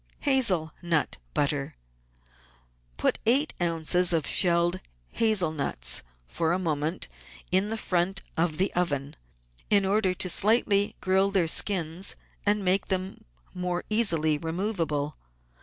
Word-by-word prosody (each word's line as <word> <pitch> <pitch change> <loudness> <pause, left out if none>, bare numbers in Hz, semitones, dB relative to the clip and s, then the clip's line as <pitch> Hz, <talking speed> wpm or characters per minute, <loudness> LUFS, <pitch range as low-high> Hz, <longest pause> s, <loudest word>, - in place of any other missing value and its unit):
15s— 280 - +3
HAZEL 185 -12 +2
NUT 170 -4 -1 0.2
BUTTER 145 -1 -1 1.2
Put - - 0
eight 275 +6 +4
oz. 165 -2 -1
of 175 -3 +2
shelled 175 +1 +2 0.3
hazel 215 -8 +1
nuts, 140 - -1 0.2
for 165 - -1
a - - 0
moment, 160 -1 -3 0.4
in 190 +3 +2
the 225 - -3
front 185 -1 -1
of 160 -2 0
the 190 +2 0
oven, 145 -5 -2 0.5
in 200 -2 +3
order 195 -1 +1
to 185 - -1
slightly 205 +1 +4
grill 190 +1 +1
their 190 -4 +1
skins 175 +1 +2 0.3
and 205 -1 +1
make 185 +2 +1
them 190 0 -2 0.8
easily 165 -9 +3
removable. 165 -4 -3
180 Hz, 125 wpm, -26 LUFS, 160-195 Hz, 1.2 s, eight